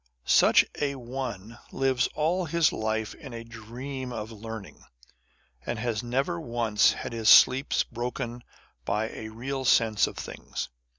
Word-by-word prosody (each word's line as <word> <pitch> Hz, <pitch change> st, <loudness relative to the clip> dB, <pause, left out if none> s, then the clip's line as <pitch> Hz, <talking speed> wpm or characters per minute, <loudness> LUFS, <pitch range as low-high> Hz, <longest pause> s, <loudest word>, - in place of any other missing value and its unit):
Such -, -, +6 dB, 0.2 s
a 140 Hz, -1 st, 0 dB
one 120 Hz, -3 st, -6 dB
lives 130 Hz, -2 st, +1 dB
all 170 Hz, +4 st, +1 dB
his 165 Hz, -1 st, +2 dB
life 110 Hz, 0 st, -2 dB
in 140 Hz, -6 st, -11 dB
a 115 Hz, -, -6 dB
dream 125 Hz, +4 st, -7 dB
of 110 Hz, -1 st, -5 dB
learning, 110 Hz, -1 st, -9 dB, 0.8 s
and 120 Hz, -, -3 dB
has 115 Hz, -2 st, -1 dB
never 135 Hz, +8 st, -1 dB
once 115 Hz, -5 st, +2 dB
had -, -, -6 dB
his 110 Hz, -2 st, +2 dB
sleep 130 Hz, +6 st, +7 dB, 0.2 s
broken 120 Hz, 0 st, -4 dB, 0.4 s
by 105 Hz, -, -1 dB
a 110 Hz, -, -7 dB
real 130 Hz, +4 st, -4 dB
sense 110 Hz, -4 st, +4 dB
of -, -, -9 dB
things. -, -, -6 dB
120 Hz, 140 wpm, -27 LUFS, 110-135 Hz, 0.8 s, sleep